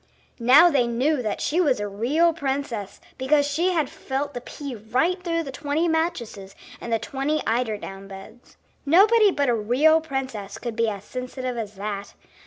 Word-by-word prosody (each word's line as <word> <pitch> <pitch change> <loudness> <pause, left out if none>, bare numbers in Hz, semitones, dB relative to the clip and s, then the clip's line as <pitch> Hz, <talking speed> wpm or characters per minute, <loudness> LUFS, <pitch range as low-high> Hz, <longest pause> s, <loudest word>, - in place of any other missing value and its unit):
Now 280 +9 +7
they 255 -5 +2
knew 255 +5 +1
that 215 -3 -3
she 335 +5 +1
was 280 -10 +2
a 205 - -2
real 275 +12 +2
princess 270 - -4 0.2
because 285 +2 +3
she 320 +6 +1
had 315 -5 +1
felt 280 +3 -4
the 245 - -5
pea 280 +2 -7
right 255 - -1
through 335 -2 -1
the 275 - -7
twenty 295 +5 -1
mattresses 240 - -2 0.3
and 235 - -6
the 225 - +3
twenty 275 +6 -2
eider 225 -2 0
down 195 -1 -9
beds. 200 +5 -13 0.3
Nobody 410 +8 +5
but 285 -6 0
a 245 - +3
real 255 +9 +3
princess 260 -9 -5
could 235 -1 -5
be 230 -1 +1
as 200 -2 -6
sensitive 255 +1 -5
as 215 -3 -5
that. 200 0 -5
260 Hz, 180 wpm, -24 LUFS, 220-305 Hz, 0.3 s, Now